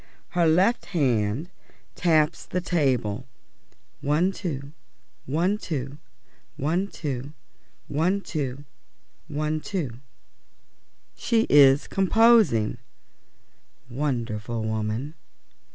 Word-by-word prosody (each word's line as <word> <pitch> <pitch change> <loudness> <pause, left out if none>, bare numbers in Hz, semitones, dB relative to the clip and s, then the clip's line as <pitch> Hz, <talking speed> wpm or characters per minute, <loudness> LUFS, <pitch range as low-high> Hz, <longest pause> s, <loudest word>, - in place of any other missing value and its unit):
Her 175 -2 +2
left 185 +9 +3
hand 125 - 0 0.4
taps 160 -2 +1
the 180 - -1
table 130 - 0 0.7
one 155 +7 +1
two, 145 -8 -5 0.6
one 175 +9 +1
two, 140 - -5 0.6
one 170 +8 0
two, 140 -6 -5 0.5
one 170 +7 +1
two, 145 -5 -4 0.6
one 155 +1 -2
two. 145 - -4 1.2
She 230 -1 +1
is 140 -1 +6
composing. 195 - +4 1.1
Wonderful 120 -4 -2
woman! 110 +6 -2
150 Hz, 80 wpm, -25 LUFS, 125-175 Hz, 1.2 s, is